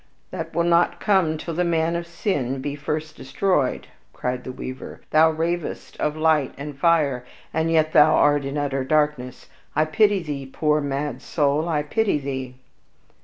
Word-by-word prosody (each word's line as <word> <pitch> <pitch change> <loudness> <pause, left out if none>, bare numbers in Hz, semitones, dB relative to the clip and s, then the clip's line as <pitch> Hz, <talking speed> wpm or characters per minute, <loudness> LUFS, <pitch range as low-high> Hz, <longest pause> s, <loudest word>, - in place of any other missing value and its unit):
"That - - -6
will 170 - +2
not 170 0 +2
come 185 -6 +2
till 165 +2 -5
the 180 +3 0
Man 165 -1 +1
of 170 0 -3
Sin 145 - -2
be 140 +2 -4
first 155 +2 -4
destroyed," 145 0 0 0.3
cried 125 0 -3
the 130 - -6
weaver; 130 +1 -8
"thou 160 +1 +6
ravest 165 +1 -3
of 150 +1 -1
light 155 -4 +2
and 145 0 -7
fire, 145 -4 +2 0.3
and 160 +1 0
yet 155 -1 +2
thou 155 +1 +6
art 145 -1 +3
in 135 +2 -4
utter 140 -2 -1
darkness. 150 -3 0 0.3
I 155 +1 +3
pity 205 +3 +2
thee, 140 -4 -5
poor 150 +2 +1
mad 140 -2 -3
soul, 150 +3 0
I 150 -2 0
pity 205 +3 +1
thee!" 130 -2 -5
150 Hz, 170 wpm, -23 LUFS, 140-165 Hz, 0.3 s, thou